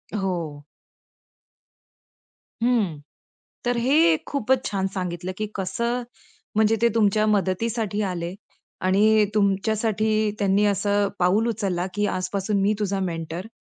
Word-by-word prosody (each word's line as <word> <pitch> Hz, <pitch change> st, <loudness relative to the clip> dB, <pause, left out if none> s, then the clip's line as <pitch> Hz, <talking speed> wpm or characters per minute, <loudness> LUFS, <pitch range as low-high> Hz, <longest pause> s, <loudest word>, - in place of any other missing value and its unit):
हो. 170 Hz, -7 st, -3 dB, 2.0 s
हं. 215 Hz, -11 st, +1 dB, 0.7 s
तर 245 Hz, 0 st, +1 dB
हे 310 Hz, +7 st, +4 dB
खूपच 265 Hz, -1 st, +1 dB
छान 195 Hz, -1 st, -1 dB
सांगितलं 180 Hz, -1 st, -3 dB
की 215 Hz, -, -1 dB
कसं, 235 Hz, +6 st, -2 dB, 0.5 s
म्हणजे 220 Hz, +1 st, +4 dB
ते 235 Hz, -, +5 dB
तुमच्या 215 Hz, -1 st, +3 dB
मदतीसाठी 210 Hz, +1 st, 0 dB
आले 175 Hz, -2 st, -3 dB, 0.5 s
आणि 210 Hz, +3 st, +4 dB
तुमच्यासाठी 215 Hz, +1 st, +1 dB
त्यांनी 200 Hz, 0 st, +3 dB
असं 205 Hz, 0 st, +1 dB
पाऊल 195 Hz, +6 st, +3 dB
उचललं 195 Hz, -5 st, -1 dB
की 205 Hz, 0 st, 0 dB
आजपासून 190 Hz, +3 st, -1 dB
मी 205 Hz, +2 st, +3 dB
तुझा 200 Hz, -2 st, -1 dB
मेंटर 170 Hz, +1 st, -4 dB
205 Hz, 110 wpm, -24 LUFS, 185-220 Hz, 2.0 s, ते